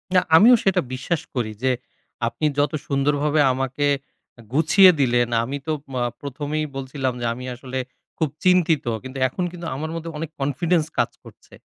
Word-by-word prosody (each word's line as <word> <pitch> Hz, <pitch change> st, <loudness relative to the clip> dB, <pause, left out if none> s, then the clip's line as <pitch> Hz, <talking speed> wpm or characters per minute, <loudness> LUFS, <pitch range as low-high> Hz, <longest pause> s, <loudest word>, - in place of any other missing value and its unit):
না, 180 Hz, -, +7 dB
আমিও 235 Hz, +8 st, +8 dB
সেটা 195 Hz, -, +3 dB
বিশ্বাস 140 Hz, +5 st, -2 dB
করি 115 Hz, -3 st, -1 dB
যে, 130 Hz, -, +3 dB, 0.6 s
আপনি 155 Hz, +6 st, -3 dB
যত 145 Hz, 0 st, +2 dB, 0.2 s
সুন্দরভাবে 145 Hz, +1 st, +1 dB
আমাকে 135 Hz, +2 st, -1 dB, 0.5 s
আ -, -, -11 dB
গুছিয়ে 175 Hz, +6 st, +7 dB
দিলেন, 120 Hz, -2 st, +3 dB, 0.2 s
আমি 135 Hz, +4 st, -3 dB
তো, 155 Hz, -, 0 dB, 0.2 s
মা 125 Hz, -, -1 dB, 0.2 s
১ম 145 Hz, +1 st, -5 dB
এই 155 Hz, -, 0 dB
বলছিলাম, 130 Hz, -1 st, -2 dB
যে -, -, -1 dB
আমি 125 Hz, +2 st, -8 dB
আসলে 130 Hz, +1 st, -6 dB, 0.4 s
খুব 160 Hz, -3 st, 0 dB, 0.2 s
চিন্তিত। 175 Hz, -6 st, +3 dB, 0.2 s
কিন্তু 130 Hz, +1 st, -8 dB
এখন 155 Hz, +8 st, -4 dB
কিন্তু 170 Hz, -1 st, -7 dB
আমার 155 Hz, +4 st, -4 dB
মধ্যে 165 Hz, 0 st, -5 dB
অনেক 160 Hz, 0 st, -4 dB
কনফিডেন্স 155 Hz, +4 st, +1 dB
কাজ -, -, +2 dB
করছে। -, -, -17 dB
145 Hz, 170 wpm, -22 LUFS, 130-165 Hz, 0.6 s, আমিও